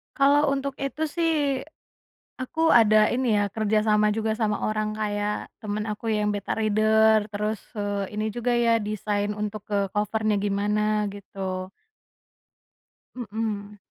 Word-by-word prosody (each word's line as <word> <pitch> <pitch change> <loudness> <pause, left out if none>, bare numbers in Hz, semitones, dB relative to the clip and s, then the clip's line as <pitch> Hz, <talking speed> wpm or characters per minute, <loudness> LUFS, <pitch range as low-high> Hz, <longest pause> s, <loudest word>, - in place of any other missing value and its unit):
Kalau 290 +1 +4
untuk 275 0 -2
itu 275 +3 -3
sih, 330 +1 0 1.1
aku 320 +5 +2
ada 215 -2 +5
ini 245 -4 +1
ya 205 - +2
kerja 215 0 +1
sama 210 -1 +3
juga 220 +1 0
sama 215 -2 0
orang 215 0 -1
kayak 210 -1 -2
temen 210 -1 -3
aku 220 +1 -4
yang 210 -1 +1
beta 200 -1 -3
reader 215 0 +3
terus, 210 +1 -2 0.2
eee, 205 0 -3
ini 215 - 0
juga 240 +1 -1
ya 230 -1 +3
desain 210 0 -2
untuk 210 0 -4
ke 205 - +1 0.2
cover-nya 210 +1 0
gimana 210 +1 0
gitu. 190 -2 -5 1.5
Mhm. 210 -3 -4
215 Hz, 135 wpm, -25 LUFS, 205-225 Hz, 1.5 s, ada